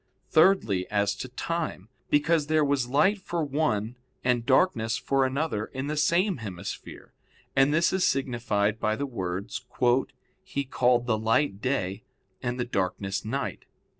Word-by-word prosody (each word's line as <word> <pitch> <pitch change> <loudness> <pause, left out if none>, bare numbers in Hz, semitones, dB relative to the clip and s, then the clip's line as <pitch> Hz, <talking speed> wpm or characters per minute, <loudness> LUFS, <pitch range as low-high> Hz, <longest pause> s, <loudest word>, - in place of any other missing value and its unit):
Thirdly, 155 - +3
as 100 -1 +1
to 130 - -5
time; 145 - -4 0.2
because 150 +1 +2
there 155 -1 +3
was 140 -3 +1
light 190 +10 +3
for 170 -3 -2
one 125 -6 -1 0.3
and 125 -2 +2
darkness 120 -6 +3
for 135 +3 +1
another 130 -5 -1
in 130 +1 -5
the 150 +1 -2
same 175 +5 +2
hemisphere; 95 -4 -8 0.4
and 135 +1 +4
this 165 +4 +3
is 190 -1 +1
signified 115 -5 0
by 110 0 +1
the 140 - -2
words, 95 -6 -4 0.8
"He 140 -7 -3
called 125 -2 +2
the 110 -3 +1
light 110 -1 +1
day, 105 -7 -1 0.4
and 120 0 -3
the 120 - 0
darkness 95 -2 -2
night." 135 +6 -3
125 Hz, 145 wpm, -27 LUFS, 110-150 Hz, 0.8 s, and